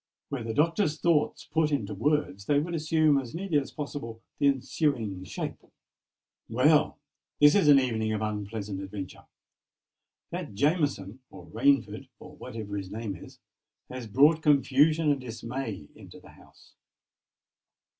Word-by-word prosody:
Were 140 -3 -3
the 115 -1 -4
Doctor's 165 0 +1
thoughts 165 -3 +1
put 160 -1 0
into 110 -8 -1
words, 110 -4 -1
they 145 - +3
would 165 +4 -1
assume 155 -2 +2
as 125 0 -7
nearly 170 -4 0
as 135 - -6
possible 140 -6 -6 0.2
the 140 - +4
ensuing 125 - -1
shape:— - - -6 0.9
"Well, 145 +6 +3 0.4
this 145 0 +7
is 195 -6 +3
an 145 -2 +8
evening 110 -4 -1
of 110 -1 -2
unpleasant 105 -1 -4
adventure! 95 -1 -8 1.1
That - - -6
Jameson, 140 - 0
or 85 - -12
Rainford, 125 -1 +1
or - - -13
whatever 105 -3 -7
his 95 -2 -6
name 105 -1 -5
is, - - -13 0.5
has 125 -2 -6
brought 145 +8 +4
confusion 150 +2 +3
and 140 -2 -1
dismay 115 - -6
into - - -14
the - - -17
house. - - -20
135 Hz, 140 wpm, -28 LUFS, 110-150 Hz, 1.1 s, an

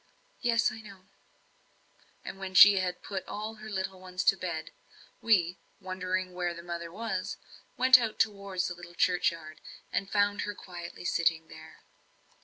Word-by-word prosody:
"Yes, 230 -2 +2
I 225 - -9
know." 195 -3 -14 1.2
And 195 - -7
when 190 -1 -6
she 200 +1 +9
had 180 -1 -3
put 195 -2 -4
all 215 +1 -5
her 215 - -8
little 190 -2 -3
ones 185 0 -4
to - - +5
bed 170 -4 -5 0.5
we, 180 -6 +2 0.2
wondering 185 0 -3
where 175 -1 -2
the 170 - -9
mother 170 -1 -5
was, 190 -2 -3 0.4
went 255 0 +8
out 225 -3 -3
towards 200 -3 0
the 175 - -4
little 175 0 -12
churchyard, 170 -3 0 0.3
and 195 - -1
found 205 0 +2
her 205 - -4
quietly 175 -1 -9
sitting 165 -2 +1
there. 160 0 -13
185 Hz, 155 wpm, -30 LUFS, 175-205 Hz, 1.2 s, she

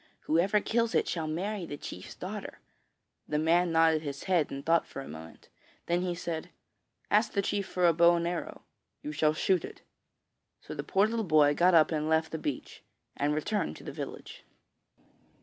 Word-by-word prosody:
Whoever 190 +7 +2
kills 230 +1 0
it - - +2
shall 160 -3 -2
marry 185 +3 -3
the 145 - -6
chief's 90 - -8
daughter.' - - -7 0.7
The 150 - -1
man 170 +3 +3
nodded 165 -1 +4
his 140 -3 -6
head 175 -6 +1
and 140 0 -7
thought 165 0 +3
for - - -8
a 135 - -7
moment; 80 +1 -11 0.4
then 175 +1 +1
he 180 -1 -2
said: 170 -1 -5 0.6
'Ask 210 +2 +3
the 200 - +1
chief 200 0 -1
for 180 -1 0
a 170 - +5
bow 170 +1 +5
and 170 0 -1
arrow: 175 -1 -5 0.4
you 150 - -4
shall 150 +1 +1
shoot 185 +2 +1
it.' - - -9 0.8
So - - -9
the 145 - -4
poor 195 +7 +3
little 225 +1 -1
boy 155 -5 +4
got 175 +3 +4
up 160 0 +5
and 155 -1 -1
left 160 0 +1
the 160 - -4
beach, 145 -3 -5 0.3
and 145 +1 0
returned 185 - -1
to - - -13
the - - -6
village. - - -8
165 Hz, 190 wpm, -29 LUFS, 155-180 Hz, 0.8 s, a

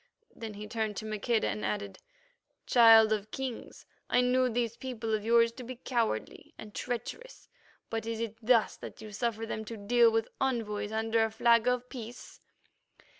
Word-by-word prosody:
Then 220 -2 -7
he 210 +1 -7
turned 220 -3 -3
to 220 - -5
Maqueda 215 +2 0
and 215 - -3
added, 200 -2 -3 0.7
"Child 225 -2 +7
of 210 0 -3
Kings, 260 0 -6 0.2
I 245 - +4
knew 250 +1 +2
these 235 -1 -1
people 235 -3 -4
of 215 -1 0
yours 230 +1 +4
to 250 +2 -10
be 255 +2 -7
cowardly 235 -2 -3
and 210 -1 -10
treacherous, 255 - -6 0.4
but 225 0 -3
is 230 -1 -3
it 225 -2 -3
thus 230 -1 +3
that - - -10
you 215 - -9
suffer 225 +1 -2
them 220 -1 -4
to 225 +1 -7
deal 230 +3 +4
with 225 0 0
envoys 225 -6 -1
under 225 +1 +1
a 225 - +1
flag 230 +1 +3
of 250 0 +1
peace?" 245 -2 -10
225 Hz, 175 wpm, -30 LUFS, 215-240 Hz, 0.7 s, Child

